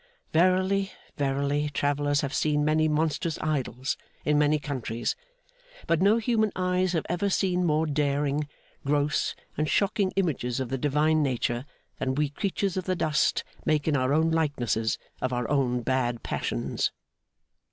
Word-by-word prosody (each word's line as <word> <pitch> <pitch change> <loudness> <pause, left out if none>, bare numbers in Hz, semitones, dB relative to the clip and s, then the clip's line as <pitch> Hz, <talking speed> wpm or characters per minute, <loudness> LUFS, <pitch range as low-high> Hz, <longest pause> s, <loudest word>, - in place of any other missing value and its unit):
Verily, 185 +3 +3 0.2
verily, 140 +1 0
travellers 145 0 +1
have 140 0 -3
seen 150 -1 +1
many 155 +1 +3
monstrous 155 +1 0
idols 135 -4 -1 0.3
in 150 - +3
many 150 +1 +3
countries; 130 -6 -3 0.7
but 165 0 +1
no 205 +4 +5
human 220 -2 +1
eyes 185 0 +1
have 165 - 0
ever 175 +4 0
seen 180 -2 +1
more 155 +1 +2
daring, 145 0 0 0.4
gross, 145 +1 +1 0.2
and 155 -1 +1
shocking 200 -1 +2
images 135 -10 0
of 130 -2 -3
the 135 - -1
Divine 150 +3 +2
nature 125 -2 -1 0.3
than 130 0 -1
we 150 0 +1
creatures 195 +4 -2
of 185 - -2
the 185 - 0
dust 155 -3 +1 0.2
make 155 -1 +1
in 155 - +3
our 130 0 +1
own 160 +2 +3
likenesses, 120 - 0 0.2
of 130 - 0
our 125 -2 -1
own 125 -4 +1
bad 120 -2 0
passions. - - -1
150 Hz, 150 wpm, -27 LUFS, 135-170 Hz, 0.7 s, no